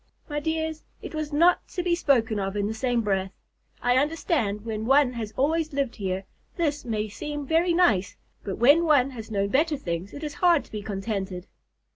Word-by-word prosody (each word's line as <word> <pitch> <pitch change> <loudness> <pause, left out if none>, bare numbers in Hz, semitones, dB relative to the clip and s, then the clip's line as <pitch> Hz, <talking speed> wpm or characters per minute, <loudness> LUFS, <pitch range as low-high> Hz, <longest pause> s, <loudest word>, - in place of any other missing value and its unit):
My 295 -1 -2
dears, 320 0 -2 0.2
it - - -7
was 310 -1 -3
not 340 +5 +3
to 360 - -4
be 350 -1 +1
spoken 235 -10 +2
of 195 +1 -2
in 200 - 0
the 215 - -2
same 240 +1 0
breath. 195 -3 -1 0.5
I 245 +1 +3
understand 285 - 0
that - - -18
when 220 -1 -3
one 270 -1 +4
has 225 -3 -5
always 310 +3 +1
lived 275 -3 -1
here, 190 -2 -3 0.3
this 300 -4 0
may 215 -3 -2
seem 290 +7 -5
very 335 +4 +2
nice, 215 - +3 0.3
but 195 - -4
when 290 +8 +5
one 280 -4 +4
has 225 -3 -8
known 200 -2 0
better 300 +5 +2
things, 175 -4 -4
it 290 - -8
is 300 -1 -4
hard 345 -4 +4
to - - -22
be 210 - -4
contented." 195 -2 -4
255 Hz, 200 wpm, -26 LUFS, 210-310 Hz, 0.5 s, when